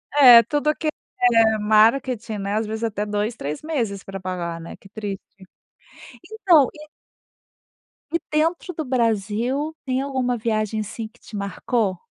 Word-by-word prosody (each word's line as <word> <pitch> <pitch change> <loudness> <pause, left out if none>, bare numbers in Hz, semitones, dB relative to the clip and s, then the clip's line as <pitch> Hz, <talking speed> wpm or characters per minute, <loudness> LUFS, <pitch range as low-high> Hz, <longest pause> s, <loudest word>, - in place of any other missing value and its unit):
É, 245 -5 +10
tudo 295 +5 0
que 315 - -4 0.3
é 225 -3 +4
marketing, 220 +1 +2
né, 200 +1 -3
às 220 0 0
vezes 220 +1 -4
até 210 -2 -2
2, 210 +2 -2
3 145 +2 -5
meses 235 -11 -3
pra 195 0 -7
pagar, 175 -2 -4
né, 165 - -9
que 195 - -17
triste. 205 -2 -5 1.3
Então, 300 -7 +7
e 305 0 -13 1.2
E 335 - +1
dentro 330 +4 0
do 315 -2 -4
Brasil, 240 +5 -1
tem 260 0 0
alguma 260 -3 -1
viagem, 215 -1 -1
assim, 215 +1 -5
que - - -27
te 215 - -12
marcou? 200 0 -1
225 Hz, 150 wpm, -22 LUFS, 210-265 Hz, 1.3 s, É